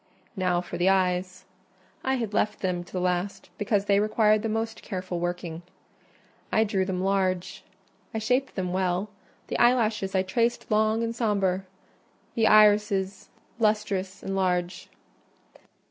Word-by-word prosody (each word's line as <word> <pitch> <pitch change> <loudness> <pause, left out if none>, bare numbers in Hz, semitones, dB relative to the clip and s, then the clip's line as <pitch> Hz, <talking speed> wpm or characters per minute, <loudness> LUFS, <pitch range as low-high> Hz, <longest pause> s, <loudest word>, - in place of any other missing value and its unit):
Now 180 -2 +1
for 175 -1 -7
the 180 +2 +4
eyes: 185 0 0 0.6
I 265 0 +1
had 230 -5 -3
left 210 +1 0
them 180 -2 -1
to - - -17
the 185 - -2
last, 180 +1 -2
because 205 -1 +1
they 200 -1 +3
required 215 0 +3
the 225 - -2
most 225 +1 -3
careful 185 -3 -4
working. 175 -1 -4 0.9
I 220 - +4
drew 200 -3 0
them 185 -1 -2
large; 190 -2 0 0.5
I - - -4
shaped 250 +5 0
them 180 -2 -2
well: 185 +2 -1 0.3
the - - -3
eyelashes 220 -5 +2
I 190 - +3
traced 235 +5 -1
long 215 +1 +2
and 230 0 -2
sombre; 195 -5 0 0.7
the 225 -2 +2
irids 210 -2 +4 0.3
lustrous 210 -4 0
and 195 - -3
large. 180 -1 -1
195 Hz, 145 wpm, -26 LUFS, 185-215 Hz, 0.9 s, the